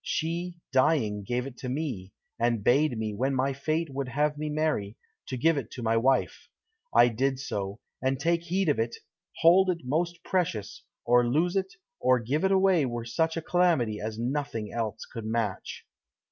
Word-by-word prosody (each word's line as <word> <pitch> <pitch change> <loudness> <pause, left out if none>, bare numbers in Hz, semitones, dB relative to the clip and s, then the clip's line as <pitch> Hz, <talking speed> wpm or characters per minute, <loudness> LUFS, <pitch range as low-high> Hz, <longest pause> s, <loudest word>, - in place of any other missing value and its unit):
She, 170 +2 -2 0.2
dying, 130 -7 +2
gave 120 +5 -2
it 135 -2 -10
me, 125 -8 -3 0.3
and 115 -2 +1
bade 135 +1 +3
me, 110 -1 -2
when 130 +6 0
my 135 +1 +1
fate 155 +4 -1
would 135 0 -3
have 150 +3 0
me 150 +1 -3
marry, 150 -9 -1 0.3
to 130 - -4
give 160 +5 +3
it 115 - -8
to 125 - -6
my 115 0 +2
wife. 130 +4 +1 0.4
I - - +6
did 130 +3 0
so; 100 -6 -4 0.2
and 130 0 0
take 170 +3 +1
heed 185 +2 0
of 145 -6 +2
it! 115 +1 -1 0.5
Hold 185 +3 +6
it 175 -2 -1
most 170 +6 -1
precious; 160 - -2 0.3
to 120 +1 +6
lose 155 +10 +1
it 190 0 -1 0.2
or 130 - +4
give 135 - -1
it 190 - +3
away 190 -4 +4
were 120 -1 -4
such 160 +8 0
calamity 160 -12 +2
as 110 0 -4
nothing 120 -3 -3
else 110 -2 -3
could 115 -3 -8
match." 110 -4 -3
135 Hz, 175 wpm, -28 LUFS, 115-160 Hz, 0.5 s, I